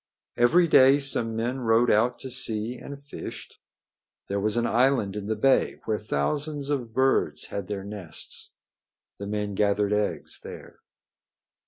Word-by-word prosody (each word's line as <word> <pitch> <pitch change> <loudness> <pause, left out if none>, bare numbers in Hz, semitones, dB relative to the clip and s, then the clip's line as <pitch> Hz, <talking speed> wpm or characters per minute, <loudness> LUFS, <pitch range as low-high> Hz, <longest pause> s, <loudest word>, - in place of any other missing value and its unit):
Every 170 +9 +4
day 135 -2 +6
some 120 -5 +1
men 120 +4 -2
rowed 115 0 +3
out 120 +3 +2
to 130 - -6
sea 115 -2 +1
and 140 +3 -9
fished. 140 0 -9 0.8
There 100 +1 -1
was 105 +3 +1
an 120 - +1
island 120 -3 +2
in 105 -1 -5
the 110 - -1
bay 135 +5 +2
where 110 -1 -1
thousands 145 - -2
of 125 -5 -2
birds 120 - +1
had 100 -3 -5
their 100 -2 -4
nests. 100 -6 -7 0.6
The 100 - -5
men 105 0 -3
gathered 100 0 +1
eggs 100 -7 -2
here. - - -11
115 Hz, 150 wpm, -26 LUFS, 105-130 Hz, 0.8 s, day